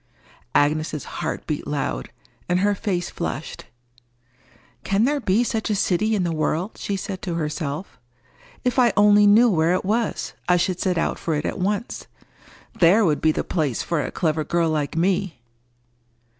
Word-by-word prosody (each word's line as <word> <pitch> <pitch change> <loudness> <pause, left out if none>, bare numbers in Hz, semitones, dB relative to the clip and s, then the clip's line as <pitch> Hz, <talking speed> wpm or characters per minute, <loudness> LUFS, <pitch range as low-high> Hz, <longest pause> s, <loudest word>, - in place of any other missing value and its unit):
Agnes's 150 0 +1
heart - - -5
beat - - -4
loud, - - -3 0.4
and 180 +1 +2
her 205 +1 +3
face 185 -3 -2
flushed. 160 -3 -5 1.2
"Can 195 +2 +1
there 290 +4 +2
be 220 -1 +2
such 225 -2 -2
a 210 - +1
city 200 +3 +1
in 195 - 0
the 170 -1 -1
world?" 160 +5 -1
she 200 - -2
said 190 0 -5
to 175 -3 -3
herself. 155 0 -4 0.6
"If 250 +1 +1
I 240 -2 +4
only 205 0 +6
knew 220 +4 +6
where 170 -4 +2
it 185 - -2
was, 220 +3 -1 0.2
I 180 - +5
should 180 +1 0
set 185 -2 0
out - - -1
for 160 - -1
it 150 - -2
at - - -3
once. 205 +5 -2 0.7
There 190 +5 +5
would 150 -4 +1
be 160 - +4
the - - -2
place 150 -9 -1
for 170 -3 -1
a - - -3
clever 155 -3 -1
girl 170 0 0
like 150 0 -2
me!" 180 -6 0
180 Hz, 170 wpm, -23 LUFS, 155-205 Hz, 1.2 s, only